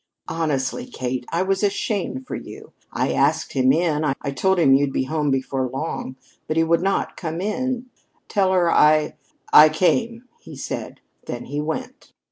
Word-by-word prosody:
Honestly, 160 - -2
Kate, 125 - -4
I 170 +2 +1
was 195 0 0
ashamed 200 - -1
for - - -7
you. - - -9 0.2
I - - -1
asked - - +1
him 130 -1 +3
in. 155 0 +1 0.2
I 140 - -4
told 190 +7 +1
him 150 -6 +5
you'd 140 0 +3
be 130 - 0
home 150 +1 -1
before 130 -1 -1
long. 130 0 -4 0.3
But 155 - -2
he 165 - +4
would 165 +1 +2
not 195 +1 -1
come 165 -1 -4
in. 250 +5 -2 0.4
'Tell 195 -3 +1
her 175 -2 +3
I 155 0 +4 0.4
I 155 +1 +9
came,' 230 +9 +1 0.2
he - - -12
said. - - -6 0.3
Then - - -5
he 145 +1 -3
went." 255 - -6
160 Hz, 170 wpm, -22 LUFS, 140-195 Hz, 0.4 s, I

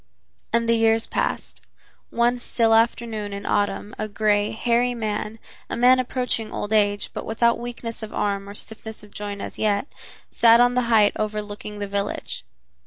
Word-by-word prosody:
And 230 0 +2
the 230 - +4
years 225 0 +3
passed. - - -3 0.5
One 240 +1 +1
still 230 -2 +2
afternoon 225 -2 +1
in 200 0 -6
autumn 205 0 -1
a 215 - -2
gray, 210 0 +1
hairy 240 +2 +1
man, 215 -1 -3 0.3
a - - -2
man 250 +2 +6
approaching 250 -3 -2
old 205 +1 -3
age, 205 -1 +2
but - - -5
without 235 +1 +1
weakness 235 -1 -6
of 220 -1 -7
arm 200 -1 -2
or 200 - -9
stiffness 220 +1 -8
of 210 - -15
joint, 205 -1 -5
as - - -7
yet, 205 +1 +1 0.5
sat 230 0 +6
on 245 0 +5
the 250 - +2
height 215 -3 +5
overlooking 210 -1 -4
the 205 - -3
village. 200 +1 -3
220 Hz, 170 wpm, -23 LUFS, 205-235 Hz, 0.5 s, man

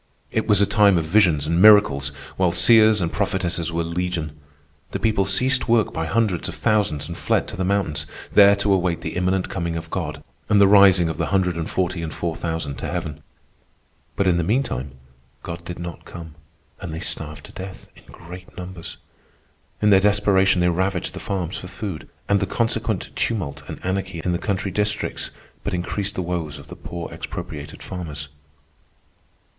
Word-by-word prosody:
It 110 - -1
was 105 -3 +5
a 100 - +5
time 100 -2 +4
of 80 - 0
visions 85 -5 +3
and 85 +3 +1
miracles, 105 -10 +6 0.3
while 95 -2 +2
seers 110 +4 +6
and 85 -1 -1
prophetesses 90 -4 -1
were 85 0 -1
legion. 85 -2 -2 0.6
The 100 - -2
people 105 -1 +1
ceased 130 +7 +2
work 115 -2 +3
by 80 0 -2
hundreds 100 -2 0
of - - -7
thousands 95 -9 +1
and 85 - -6
fled - - 0
to - - -6
the 95 - -2
mountains, 95 -5 -1 0.3
there 100 0 +7
to 100 0 +1
await 90 -3 0
the - - -5
imminent 90 +1 0
coming 85 -3 -3
of 80 0 -7
God - - -4 0.3
and 105 - +5
the 100 - +7
rising 95 -3 +6
of 80 0 -4
the 85 - 0
hundred 95 -3 +1
and 80 -1 -3
forty 90 -2 -1
and 80 -1 -4
four 85 0 -3
thousand 80 -4 -4
to - - -4
heaven. 80 -4 -4 0.9
But 100 - +1
in 90 -2 +3
the 85 - +1
meantime 85 - -1 0.5
God 85 0 -6
did 90 0 -6
not 85 -1 -7
come, 80 -3 -10 0.5
and 85 - -6
they 80 - -5
starved 75 -3 -4
to - - -13
death 95 0 -9
in - - -18
great 90 +2 -12
numbers. 90 -2 -8 0.9
In 105 - +5
their 95 - +7
desperation 100 -2 +3
they 90 - +3
ravaged 95 +1 -1
the - - -7
farms 95 -3 -3
for 90 - -8
food, 95 -4 -6 0.2
and 100 0 +3
the 95 - -1
consequent 115 -1 -1
tumult 90 -12 -2
and - - -6
anarchy 95 -2 -2
in 90 - +1
the 85 - -1
country 100 -1 -2
districts 105 +2 -1 0.3
but 100 - -2
increased 100 +3 -3
the 90 - -2
woes 85 -3 -3
of 70 +1 -13
the 90 - -8
poor 85 -1 -7
expropriated - - -7
farmers. 75 -6 -6
90 Hz, 185 wpm, -22 LUFS, 85-100 Hz, 0.9 s, there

